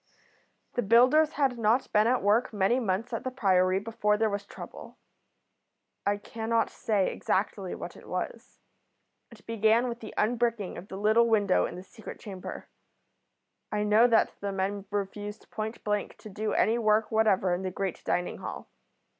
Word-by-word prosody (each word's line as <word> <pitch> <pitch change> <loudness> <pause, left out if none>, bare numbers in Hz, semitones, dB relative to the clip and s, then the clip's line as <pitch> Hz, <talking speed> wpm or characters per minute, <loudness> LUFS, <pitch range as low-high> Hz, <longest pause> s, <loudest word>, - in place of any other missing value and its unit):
"The 245 - 0
builders 255 +9 +5
had 265 -4 +1
not 230 +4 +1
been 215 +1 +4
at 250 -2 +2
work 215 +5 +3
many 210 +4 +2
months 225 +2 -2
at 230 - -3
the 260 - -2
Priory 190 -7 +2
before 210 0 0
there 220 0 +1
was 200 0 -4
trouble. - - -10 1.1
I 205 0 +2
cannot 225 +2 -1
say 205 -4 0
exactly 190 -1 -2
what - - -7
it - - -14
was. - - -5 0.7
It 225 -3 -17
began 225 +2 +2
with 235 -1 -4
the 220 - -9
unbricking 230 -2 0
of 190 - -9
the 190 - -7
little 220 +3 +4
window 205 -4 +3
in - - -8
the 180 - -8
secret 220 +3 -11
chamber. 190 -4 -8 1.0
I 210 0 0
know 215 +3 +5
that 230 -2 +3
the 200 0 -3
men 195 +1 -2
refused 205 +1 -5
point 220 +1 -5
blank 210 -1 -2
to 215 - -11
do 215 +2 -2
any 230 +2 +2
work 215 0 +2
whatever 205 -5 +3
in 175 - -1
the 190 - -2
great 190 -1 -4
dining 180 - -1
hall. - - -7
215 Hz, 170 wpm, -28 LUFS, 200-230 Hz, 1.1 s, builders